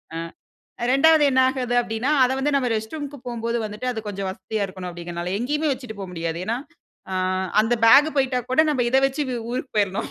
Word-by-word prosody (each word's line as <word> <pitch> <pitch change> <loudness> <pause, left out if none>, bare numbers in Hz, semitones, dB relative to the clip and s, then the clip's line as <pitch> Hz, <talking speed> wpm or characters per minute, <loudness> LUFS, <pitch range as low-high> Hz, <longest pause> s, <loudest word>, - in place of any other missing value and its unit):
அ - - -3 0.7
இரண்டாவது 295 +4 +5
என்ன 260 0 +3
ஆகுது 255 -2 -2
அப்பிடின்னா, 235 +3 -2
அத 250 - +1
வந்து 285 +2 0
நம்ம 255 -3 +1
ரெஸ்ட் 220 +3 -4
ரூம்க்கு 290 -1 -6
போம்போது 235 -1 -2
வந்துட்டு 210 +4 -5
அது 220 - -4
கொஞ்சம் 195 -1 -4
வசதியா 200 +2 -3
இருக்கணும். 185 -1 -8
அப்பிடிங்கனால, 175 0 -5
எங்கேயுமே 295 +6 -1
வச்சிட்டு 250 -5 -7
போ 195 - -4
முடியாது. 165 -1 -3
ஏனா, 230 +2 0 0.6
ஆ - - -1 0.5
அந்த 235 +2 +1
பேக் 285 +6 +7
போயிட்டா 265 -2 +2
கூட 255 - +4
நம்ம 255 -5 +1
இத 265 - +4
வச்சி 275 +3 -2
ஊ 245 - -2
ஊருக்கு 255 0 -5
போயிர்ணும் 205 +1 0
240 Hz, 195 wpm, -23 LUFS, 205-270 Hz, 0.7 s, பேக்